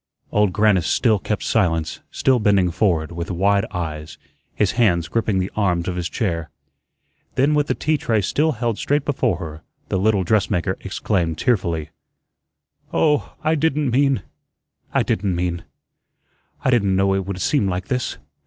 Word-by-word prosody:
Old 105 -2 +3
Grannis 105 -3 +3
still 110 -4 +2
kept 105 +2 -3
silence, 80 -8 0
still 130 -2 +2
bending 100 -4 +3
forward, 85 -4 +1
with 85 0 -5
wide 100 +2 +2
eyes, 75 -3 -5 0.4
his 105 -3 +2
hands 90 -9 +2
gripping 110 -2 0
the 95 +1 -1
arms 90 -5 0
of 90 - -2
his 90 -1 -2
chair. 85 -7 -2 0.9
Then 140 +3 +3
with 150 0 +2
the - - 0
tea 155 0 0
tray 115 -5 0
still 150 - +1
held 115 -2 -2
straight 145 0 0
before 130 - 0
her, 80 -3 -7 0.3
the 95 - 0
little 100 -1 +2
dressmaker 95 -2 +1
exclaimed 90 -4 -1
tearfully: 85 - 0 1.0
"Oh, 150 -2 +1
I 155 - +2
didn't 150 -3 +1
mean 135 -4 +2 0.7
I - - +2
didn't 95 -1 0
mean 85 -1 -2 1.0
I 130 - +4
didn't 100 -6 +2
know 95 0 +2
it 95 -1 -1
would 100 -1 -4
seem 130 0 +1
like 90 0 -3
this. 125 -1 -2
100 Hz, 160 wpm, -21 LUFS, 85-120 Hz, 1.0 s, I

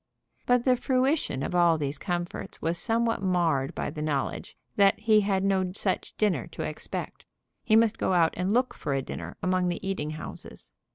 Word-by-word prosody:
But 245 -1 +4
the 255 -1 +5
fruition 255 - 0
of - - -3
all 170 -2 +4
these 145 -1 -3
comforts 175 -2 -4
was 165 +1 0
somewhat 230 0 +1
marred 170 -8 +1
by - - -3
the 150 0 -6
knowledge 150 -3 -2 0.2
that 200 -1 +4
he 215 -1 +4
had 195 -1 0
no 190 -2 +1
such 195 -1 -2
dinner 210 -4 +1
to - - -4
expect. - - -6 0.4
He 220 -3 +3
must 225 0 +3
go - - +1
out 170 -2 +3
and 180 +2 -1
look 250 +3 +2
for 140 -2 -3
a 135 - -1
dinner - - -7
among 185 0 +1
the 175 +2 -3
eating 190 -6 -2
houses. 155 0 -8
185 Hz, 185 wpm, -27 LUFS, 165-220 Hz, 0.4 s, the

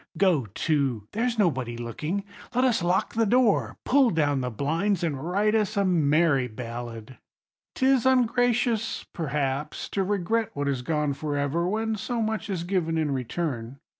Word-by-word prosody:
Go 170 - +3
to: 135 -9 0
there's 235 +2 -1
nobody 130 - 0
looking; 150 - -3 0.3
let 250 - +3
us 245 -6 +2
lock 175 +2 +1
the 225 -1 +2
door, 245 -1 +2
pull 270 -2 +4
down 145 -6 +1
the 125 - -2
blinds, 165 - 0
and 145 -5 -2
write 205 +3 +2
us 215 -1 +1
a 200 - +3
merry 155 -5 +3
ballad. 115 0 -7 0.6
'Tis 260 -1 +3
ungracious, 240 -3 +2
perhaps, 145 -3 -2
to 195 - 0
regret 205 +3 0
what 145 0 -2
is 135 -3 -1
gone 150 +1 0
for 145 +1 -3
ever, 145 +5 0
when 220 +3 -1
so 235 +4 -3
much 220 -1 -2
is 180 -4 -2
given 175 -3 0
in 155 -2 0
return. 130 -1 -3
170 Hz, 160 wpm, -26 LUFS, 140-215 Hz, 0.6 s, pull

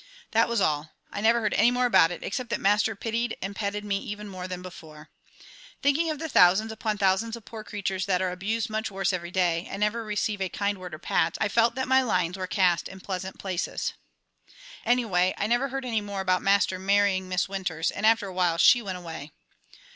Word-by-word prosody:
That 225 +1 +3
was 235 -1 +1
all. 155 -4 0 0.2
I 200 - -4
never 230 +2 +4
heard 215 - 0
any 225 +3 +5
more 250 0 +1
about 230 -9 +5
it, 175 - -7
except 250 +3 -4
that - - -1
Master 210 +2 +2
pitied 230 +3 -2
and 195 +1 -5
petted 205 0 -3
me 200 -1 0
even 210 +1 -7
more 185 -2 -6
than 180 -1 -6
before. 155 -4 -12 0.7
Thinking 295 +4 +2
of 310 - -2
the 320 +2 -4
thousands 210 - +4
upon 220 -1 -2
thousands 200 +4 +1
of 230 -2 -12
poor 220 -2 -8
creatures 195 -3 -3
that 185 -2 +2
are 185 -1 0
abused 215 +6 -2
much 220 0 -3
worse 195 -1 -1
every 175 -1 -3
day, 175 -2 0
and 195 - -6
never 220 +2 0
receive 210 -1 -2
a 190 - 0
kind 200 +1 -2
word 180 -3 -7
or - - -9
pat, 160 - 0
I 210 - +1
felt 230 +3 +3
that 260 0 -2
my 265 0 +5
lines 180 -8 0
were 185 -1 -4
cast 180 -3 +2
in 190 - -11
pleasant 190 0 -5
places. 185 -2 -3 0.9
Anyway 200 -7 +2
I - - -1
never 240 +5 +1
heard 270 0 -4
any 225 -3 0
more 200 -1 -4
about 185 -1 +1
Master 195 -2 +2
marrying 195 -1 +2
Miss 185 +1 0
Winters, 185 -4 -2
and 200 - -7
after 225 -1 +4
awhile 180 -3 0
she 245 +7 +6
went 190 -4 -5
away. 160 -4 -8
200 Hz, 215 wpm, -26 LUFS, 185-225 Hz, 0.9 s, she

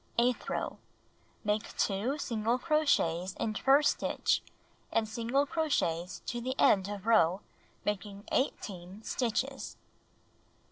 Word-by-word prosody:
Eighth 240 +1 +2
row: - - -3 0.6
Make 210 0 -1
2 220 +8 0
single 230 -3 0
crochets 220 - +1
in 215 - 0
first 275 +6 +4
stitch - - +1 0.5
and 225 -1 +1
single 235 +6 +1
crochets 195 - -1
to 240 - -3
the 260 +2 -2
end 195 -1 +4
of 205 -1 -6
row, 195 -5 +4 0.4
making 205 -1 -3
18 195 -6 -2
stitches. 260 +4 -2
220 Hz, 110 wpm, -31 LUFS, 195-260 Hz, 0.6 s, first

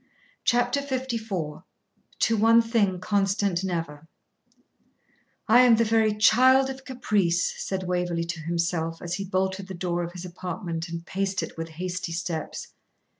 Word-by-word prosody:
CHAPTER 245 +3 +2
LIV 265 -2 -3 1.1
'TO 230 - +3
ONE 225 +2 +6
THING 210 -5 +1
CONSTANT 195 -2 0
NEVER' 165 -4 -4 1.4
'I 235 +3 +7
am 245 -2 +7
the 230 - +3
very 220 -1 +2
child 260 +5 +5
of 265 0 -10
caprice,' 205 -9 0
said 190 -1 -3
Waverley 180 -2 -1
to 170 0 -5
himself, 165 0 -2
as 175 0 -5
he 195 - -3
bolted 190 0 -1
the 190 - -7
door 175 0 -2
of 175 0 -5
his 180 0 -7
apartment 175 -1 -5
and 165 0 -6
paced 195 +1 -2
it - - -7
with 165 0 -5
hasty 180 -1 -3
steps. 165 -2 -4
185 Hz, 145 wpm, -26 LUFS, 170-225 Hz, 1.4 s, I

